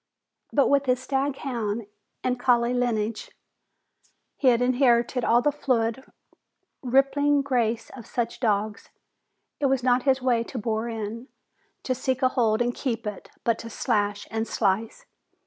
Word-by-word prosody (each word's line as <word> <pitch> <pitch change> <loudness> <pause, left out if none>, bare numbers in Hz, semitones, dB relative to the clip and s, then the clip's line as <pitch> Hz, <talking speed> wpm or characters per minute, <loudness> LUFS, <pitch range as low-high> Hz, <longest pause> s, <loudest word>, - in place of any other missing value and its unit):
But 280 - +3
with 280 -1 +2
his 250 0 +2
staghound 255 -5 -2 0.4
and 250 -1 0
collie 240 -1 +3
lineage, 230 -3 -1 1.1
he 270 - 0
had 240 -2 +5
inherited 245 -1 +2
all 240 +2 +3
the 295 - +3
fluid, 250 -3 0 0.8
rippling 275 +2 +3
grace 235 -4 0
of 235 -4 -11
such 235 -1 -3
dogs. 215 -2 -1 0.7
It 280 - +2
was 265 -2 +1
not 250 0 +3
his 265 0 +2
way 245 -3 +1
to 250 - -8
bore 225 +1 -2
in, 225 +2 -5 0.6
to 255 - 0
seek 260 +1 -2
a 255 - +5
hold 230 -3 +2
and 245 0 -1
keep 240 -4 -3
it, 210 -2 -6
but 230 -1 +1
to 230 - -7
slash 205 -2 -1
and 225 0 -2
slice. 215 +2 -1
245 Hz, 145 wpm, -25 LUFS, 225-260 Hz, 1.1 s, had